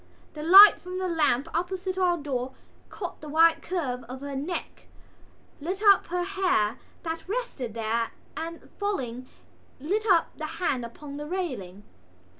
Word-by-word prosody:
The 300 - -7
light 390 +6 +9
from 365 +1 -6
the 370 0 -1
lamp 305 -5 +1
opposite 370 +2 -2
our 360 -2 +2
door 265 -4 -3 0.4
caught 360 -4 -7
the 300 - -8
white 325 +2 +4
curve 270 -9 -3
of 255 +3 -9
her 280 -1 -5
neck, 300 +7 -5 0.7
lit 370 +7 -4
up 400 -2 +6
her 355 +1 -1
hair 360 - 0 0.2
that 330 +1 -5
rested 390 - -4
there 230 +1 -1 0.3
and, 330 +1 -6
falling, 255 - -3 0.5
lit 405 +10 -1
up 350 -5 +3
the 310 - -5
hand 280 -8 0
upon 280 +5 -9
the 295 0 -6
railing. 245 - -4
325 Hz, 150 wpm, -27 LUFS, 260-370 Hz, 0.7 s, light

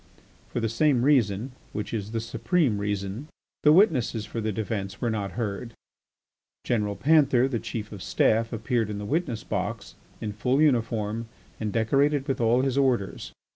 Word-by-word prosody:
For - - -2
the 115 - 0
same 125 +2 +2
reason, 125 -4 +2 0.2
which 105 0 -4
is 105 -2 -3
the 115 +1 -2
supreme 115 - 0
reason, 100 +5 -3 0.3
the 150 - +6
witnesses 135 - +3
for 115 - -5
the 110 0 -1
defence 100 -2 -4
were 120 - 0
not 100 -3 -3
heard. 115 0 -4 0.9
General 105 -4 0
Panther, 135 - +4
the 125 -4 -2
Chief 110 -2 -5
of 105 - -8
the - - -8
Staff, 110 +3 +2
appeared 115 -1 -1
in 105 - -4
the 105 - -5
witness 130 -4 -1
box, - - -4 0.3
in 105 -1 -4
full 125 +6 +1
uniform 115 -6 +1 0.3
and 110 -2 -2
decorated 140 +6 +2
with 135 -2 -1
all 120 +3 +3
his 135 0 +1
orders. 125 -8 0
115 Hz, 170 wpm, -26 LUFS, 105-130 Hz, 0.9 s, the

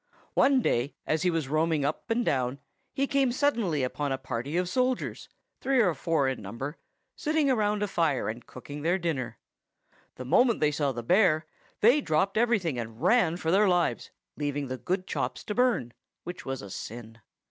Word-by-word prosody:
One 270 -3 +4
day, 120 +5 0
as 155 0 0
he 180 - +2
was 165 -5 -1
roaming 155 0 +1
up 145 - -3
and 235 +1 +1
down, 130 -1 0 0.3
he 275 - 0
came 275 -3 +2
suddenly 230 - +1
upon 140 +2 -2
a 135 - 0
party 130 +4 -4
of 180 0 +1
soldiers, 255 +6 -1 0.3
three 270 -1 +2
or 190 -7 +4
four 155 -1 0
in 130 -3 -2
number, 115 - -6 0.4
sitting 305 -2 +1
round 210 -2 +1
a - - 0
fire, 165 -8 0
and 115 +3 -4
cooking 145 +3 -9
their 170 +4 +2
dinner. 160 -9 -3 0.8
The 130 - -7
moment 235 - +4
they 150 -1 +3
saw 145 -2 0
the 120 -2 -5
bear, 170 - +3 0.4
they 245 +7 +6
dropped 175 - +1
everything, 215 - +1
and 115 -1 -6
ran 175 - +3
for 160 -2 -1
their 200 +3 +5
lives, 175 -1 +1 0.3
leaving 145 -2 -2
the 130 - -3
good 185 +5 -2
chops - - -3
to 210 - -4
burn, 235 - +1 0.3
which 175 -4 -8
was 135 -3 -4
a 100 - -9
sin. 115 +2 -8
160 Hz, 185 wpm, -28 LUFS, 135-210 Hz, 0.8 s, they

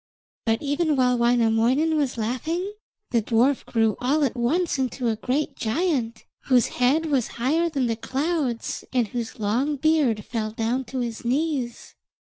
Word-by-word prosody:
But 225 +3 +1
even 295 +2 +1
while 250 -2 +3
Wainamoinen 240 +5 +3
was 280 -5 0
laughing, 315 - -2 0.4
the 235 - +3
dwarf 240 +5 +2
grew 225 -2 +1
all 285 +5 +2
at 265 - 0
once 285 +6 0
into 255 -2 -1
a 220 - 0
great 260 +7 -2
giant, 235 -3 -1 0.2
whose 250 -4 +3
head 285 +6 +3
was 275 -7 +1
higher 315 +8 +1
than 275 -5 0
the 230 -1 0
clouds, 270 0 -2
and 245 -5 +1
whose 235 0 -5
long 240 +8 0
beard 280 -7 +2
fell 220 -2 -2
down 230 +4 -1
to 260 0 -4
his 235 -2 -4
knees. 260 -1 -2
255 Hz, 155 wpm, -24 LUFS, 230-295 Hz, 0.4 s, while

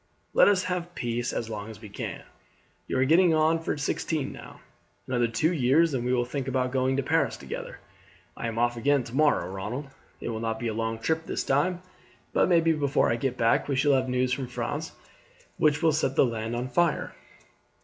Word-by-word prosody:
Let - - +6
us 200 -3 +3
have 175 -1 -3
peace 120 0 -2
as 115 - -3
long 105 -1 -6
as 110 -1 -10
we 110 - -10
can. 100 - -6 0.6
You - - -1
are 130 - +3
getting 165 +3 +5
on 160 +1 +3
for 160 - -2
sixteen 145 +1 -2
now; - - -11 0.5
another 120 -2 +1
two 150 +9 +1
years 150 +3 +3
and 125 -3 -1
we 125 - 0
will 125 -1 +2
think 130 +1 -4
about 130 -1 0
going 130 0 +1
to 140 - 0
Paris - - +1
together. - - -7 0.6
I - - -4
am 115 0 -4
off 120 0 +2
again 140 +3 +2
tomorrow, 145 +6 +1
Ronald; 105 +9 -5 0.3
it - - -5
will 110 -1 -3
not 115 0 -2
be 115 0 -2
a - - -3
long 115 0 -2
trip 160 +8 -1
this - - -2
time, 175 +7 +1 0.5
but - - +3
maybe 165 -2 +4
before 145 -2 +2
I - - +2
get 125 +1 -2
back 115 0 +2
we 140 - 0
shall 140 +2 +3
have 130 -1 +1
news 125 0 +1
from 130 0 -3
France 125 - -4 0.6
which 150 +1 +2
will 160 - +5
set 140 -3 0
the - - +5
land 115 -1 -3
on 120 +1 -2
fire." 170 +5 0
130 Hz, 210 wpm, -27 LUFS, 120-155 Hz, 0.6 s, Let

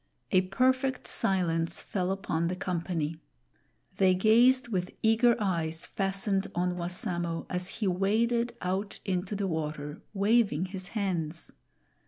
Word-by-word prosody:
A 185 - +5
perfect 260 +7 +1
silence 170 -3 0
fell 185 -2 -2
upon 180 -4 -1
the 180 - -1
company. 170 -3 -2 0.8
They 185 -1 +4
gazed 240 +6 +5
with 185 -4 -1
eager 225 +2 +5
eyes 165 -6 -1
fastened 195 0 -1
on 180 +1 0
Wassamo, 175 -1 -2
as 180 0 -1
he 215 -3 -2
waded 230 +6 +1
ont 190 +3 -2
into 185 +1 -1
the 200 0 -1
water, 150 -3 -3
waving 200 -4 +3
his 185 -1 -5
hands. 175 -5 -2
185 Hz, 125 wpm, -29 LUFS, 175-210 Hz, 0.8 s, A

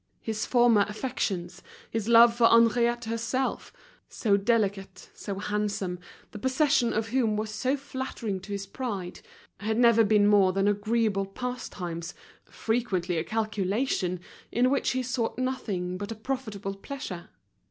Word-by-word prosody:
His 220 -1 -3
former 240 -4 +5
affections, 190 -6 -3 0.3
his 225 -2 -2
love 235 0 +8
for 235 -1 +5
Henriette 235 +1 +4
herself—so 230 -2 -2
delicate, 200 -2 -1
so 200 -2 -6
handsome, 205 -3 -2 0.3
the 210 - -8
possession 260 0 +2
of 220 +1 -1
whom 225 -4 +1
was 215 0 -3
so 255 +6 0
flattering 260 -7 -4
to 195 +3 -11
his 200 -1 -3
pride—had 205 0 -6
never 235 -2 +6
been 210 -1 +4
more 200 -3 +5
than 195 +1 +1
agreeable 205 -1 +1
pastimes, 195 -7 -5 0.3
frequently 195 -7 -1
a - - -1
calculation, 205 -1 -1 0.3
in 250 +2 +2
which 280 - +1
he 255 0 -1
sought 240 -2 -2
nothing 200 -9 -2
but 205 +2 -5
a - - -4
profitable 215 -5 -4
pleasure. 195 -5 -7
215 Hz, 130 wpm, -27 LUFS, 195-240 Hz, 0.3 s, love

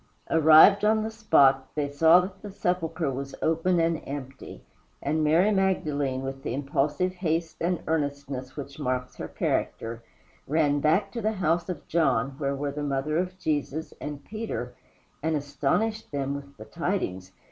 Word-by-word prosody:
Arrived 160 +6 +7
on 215 +1 +3
the 220 - -3
spot, 140 -12 +3
they 150 -1 0
saw 160 +5 +5
that 190 +1 -7
the 210 - -7
sepulchre 170 -5 -1
was 135 +1 -5
open 165 +2 +2
and 165 -1 +1
empty, 135 -1 -8 0.4
and 155 +2 0
Mary 165 +7 +4
Magdalene, 150 -9 0
with 135 0 -5
the 130 -3 -3
impulsive 145 +6 0
haste 165 -2 -2
and 170 0 0
earnestness 140 -4 -3
which 140 0 -7
marks 125 -2 -2
her - - -5
character, 115 0 -2 0.5
ran 145 -1 +2
back 180 +7 +2
to 230 - -4
the 215 +1 0
house 170 -2 0
of 175 -5 -5
John, 135 -6 +1
where 140 -1 -1
were 140 +1 -3
the 150 +1 -5
mother 145 +1 -1
of 180 +1 -2
Jesus, 155 -2 -2
and 145 -1 -6
Peter, 200 - -5 0.5
and 160 +1 0
astonished 150 - -1
them 140 -1 -2
with 140 0 -8
the 110 - -10
tidings. 110 - -3
150 Hz, 160 wpm, -27 LUFS, 140-180 Hz, 0.5 s, Arrived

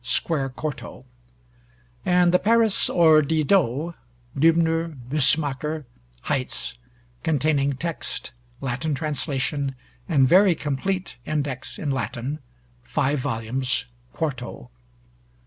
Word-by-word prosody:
square 135 +2 +1
4to); 135 -1 -6 1.0
and 180 +1 +4
the 180 - +5
Paris 225 -1 +3
or 160 -3 +6
Didot 155 0 +1 0.4
(Dübner, 165 +1 +2
Bussemaker, 150 +1 +2 0.4
Heitz), 135 -4 -3 0.5
containing 145 -3 +1
text, 170 +4 -4 0.3
Latin 140 +3 -1
translation, 140 -2 -1 0.3
and 140 -6 +4
very 185 +3 +6
complete 170 +6 -3
Index 145 -4 -3
in 145 - -2
Latin 135 +2 -3 0.4
(5 140 +4 0
vols., 125 +2 -1 0.3
4to). 125 - -4
150 Hz, 90 wpm, -24 LUFS, 135-165 Hz, 1.0 s, or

